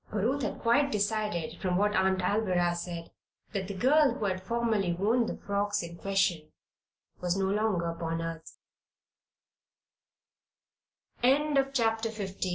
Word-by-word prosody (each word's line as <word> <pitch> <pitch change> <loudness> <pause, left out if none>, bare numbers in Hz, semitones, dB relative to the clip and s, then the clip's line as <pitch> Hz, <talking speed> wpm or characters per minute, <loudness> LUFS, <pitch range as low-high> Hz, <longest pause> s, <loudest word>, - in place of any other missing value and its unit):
For 210 - -2
Ruth 260 +8 +1
had - - -2
quite 280 +5 +2
decided, 205 -6 -1
from 180 -3 +1
what 210 +2 +2
Aunt 190 0 +2
Alvirah 180 -4 +1
said, 170 -1 -6 0.4
that 195 -2 -2
the 200 - -5
girl 270 +4 +4
who 220 - -3
had 185 -1 -1
formerly 215 -3 0
worn 225 +6 +1
the - - -4
frocks 205 -1 -1
in 170 0 -7
question 185 -5 0 0.7
was 180 +1 -1
no 195 - +1
longer 205 -5 +1
upon 165 0 -3
earth. 165 -1 -6 2.6
CHAPTER 270 -4 +2
XVI 195 -3 -4
200 Hz, 135 wpm, -29 LUFS, 180-225 Hz, 2.6 s, girl